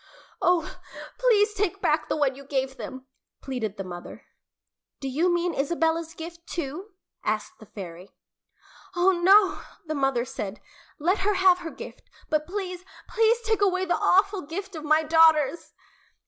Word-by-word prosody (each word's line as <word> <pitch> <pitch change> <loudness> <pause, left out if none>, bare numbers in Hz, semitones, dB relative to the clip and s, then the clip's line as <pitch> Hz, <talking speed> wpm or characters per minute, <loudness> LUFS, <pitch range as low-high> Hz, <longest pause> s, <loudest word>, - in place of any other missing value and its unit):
"Oh, 355 -2 +1 0.4
please 430 -4 +4
take 400 -2 -1
back 305 -4 +1
the - - 0
one 285 -3 +2
you 280 - -11
gave 265 -1 -2
them," 260 0 -8 0.3
pleaded 230 -6 -4
the 195 - -4
mother. 175 -1 -9 0.7
"Do 270 - -4
you 320 +7 +1
mean 345 0 0
Isabella's 325 +2 0
gift, 335 +1 -9
too?" 340 +6 -5 0.3
asked 215 0 -2
the 215 - -14
fairy. 180 -2 -10 0.8
"Oh, 355 +2 +4
no," 380 +2 +4 0.2
the 310 - -3
mother 270 -4 +1
said. 210 -4 -6 0.4
"Let 360 +7 +1
her 405 +1 +1
have 370 -1 +5
her 340 -2 -6
gift - - -11 0.2
but 305 0 +1
please, 365 -2 -5 0.3
please 455 +1 +3
take 440 -2 0
away 375 -2 +2
the 350 - +1
awful 395 +1 +3
gift 380 +5 -6
of 310 - -6
my 310 +1 +3
daughters!" 320 -1 +4
330 Hz, 155 wpm, -26 LUFS, 275-380 Hz, 0.8 s, have